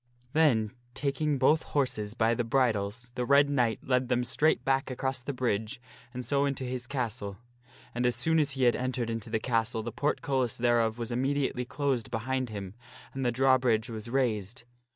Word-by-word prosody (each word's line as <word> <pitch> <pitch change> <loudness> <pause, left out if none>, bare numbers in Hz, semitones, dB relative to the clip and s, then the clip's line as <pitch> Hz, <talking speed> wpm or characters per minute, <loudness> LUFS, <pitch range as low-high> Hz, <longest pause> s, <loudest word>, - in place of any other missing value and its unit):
Then 125 -10 +3 0.2
taking 140 +2 0
both 150 +4 +4
horses 110 -7 -1
by 115 -1 +2
the 120 - 0
bridles 115 -1 0
the 125 - -2
Red 140 +2 +4
Knight 120 -5 +1
led 125 -1 +1
them 125 -1 +2
straight 150 +6 +1
back 135 0 +1
across 130 0 -2
the 135 - -4
bridge 120 -2 -2 0.3
and 125 -1 -6
so 140 +3 +2
into 135 -2 -2
his 125 -1 -4
castle. 115 -7 -3 0.6
And 125 +1 +1
as 125 - +1
soon 160 0 +2
as 145 -2 +1
he 135 -1 -1
had 120 -1 +5
entered 125 -2 -2
into 115 0 -4
the 110 - +1
castle 115 -1 0
the 120 - -4
portcullis 130 -2 0
thereof 115 -2 +2
was 120 0 -4
immediately 130 0 0
closed 130 -3 -1
behind 130 +2 -2
him 100 -3 -6 0.4
and 135 - -3
the 120 - +2
drawbridge 125 -2 +2
was 110 0 -6
raised. 115 -3 -1
125 Hz, 180 wpm, -29 LUFS, 115-135 Hz, 0.6 s, had